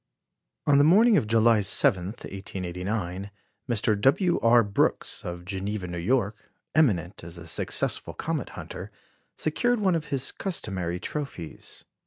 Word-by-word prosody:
On 140 -1 +5
the - - +6
morning 210 +9 +6
of 115 - +2
July 115 0 +4
7, 100 -1 +3
1889, 95 -1 -5 0.4
Mr. 110 -3 +1
W. 175 - +3
R. 115 0 +5
Brooks, 100 -1 0
of 90 0 -6
Geneva, 100 +1 -3
New 85 -1 -5
York, 105 +2 -1 0.2
eminent 100 - +1
as 85 +1 -7
a 85 - -9
successful 80 - -2
comet - - -3
hunter, - - -7 0.5
secured 230 +11 +1
one 190 -3 +2
of 165 -3 -1
his 135 -2 0
customary 95 - -2
trophies. 135 - -6
105 Hz, 135 wpm, -26 LUFS, 90-140 Hz, 0.5 s, the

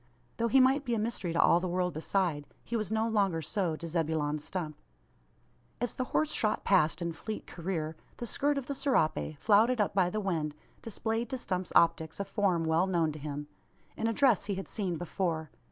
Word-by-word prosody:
Though 230 - +1
he 265 +4 +5
might 265 +2 +4
be 240 -4 0
a - - 0
mystery 215 -5 -2
to 165 - -1
all 170 - +6
the 185 - -2
world 180 0 0
beside, 160 -2 0 0.2
he 235 - -4
was 215 -3 -2
no 220 +1 +1
longer 200 -7 +1
so 175 0 -1
to 170 - -8
Zebulon 155 -2 0
Stump. 155 -1 -5 1.0
As 245 0 0
the 255 - -2
horse 310 +4 0
shot 215 -1 0
past 170 -3 +3
in 170 -1 -2
fleet 215 +6 -6
career, 160 -3 -3 0.2
the 240 - -4
skirt 285 +4 0
of 275 - -3
the 280 - -3
serape, 230 - 0
flouted 220 - +4
up 210 - +1
by 185 -3 +3
the 215 - -2
wind, 160 -7 -1 0.3
displayed 225 +1 -2
to 265 - -2
Stump's 185 -6 -3
optics 160 0 +3
a 200 - -1
form 195 -4 +1
well 160 +3 +2
known 170 -4 +1
to 150 - -8
him 145 0 -5 0.5
in 225 - -1
a - - +2
dress 245 -5 +3
he 200 -1 -2
had 195 - -5
seen 185 -5 -2
before. 165 -3 -2
190 Hz, 205 wpm, -31 LUFS, 160-225 Hz, 1.0 s, all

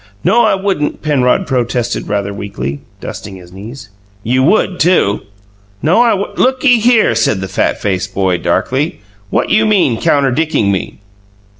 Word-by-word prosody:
"No, 235 +1 +4
I 215 - +3
wouldn't," 190 -6 -2
Penrod 145 +4 +1
protested 120 -3 -2
rather 100 0 -2
weakly, 70 -9 -5 0.2
dusting 100 -2 -8
his 90 -2 -13
knees. 115 +5 -10 0.3
"You 125 +4 +1
would, 180 +4 +2
too!" 160 - +2 0.6
"No, 170 +10 +4
I 240 - +4
w 200 -2 0
"Looky 255 -1 +3
here," 225 - +3
said 110 -3 +1
the 95 - -4
fat - - -1
faced 95 -1 -2
boy, 95 -2 +1
darkly, 135 0 -1 0.3
"what - - -1
you 220 0 +3
mean, 180 - +2
counterdicking 140 -5 +1
me?" 95 - -3
130 Hz, 150 wpm, -14 LUFS, -, 0.6 s, No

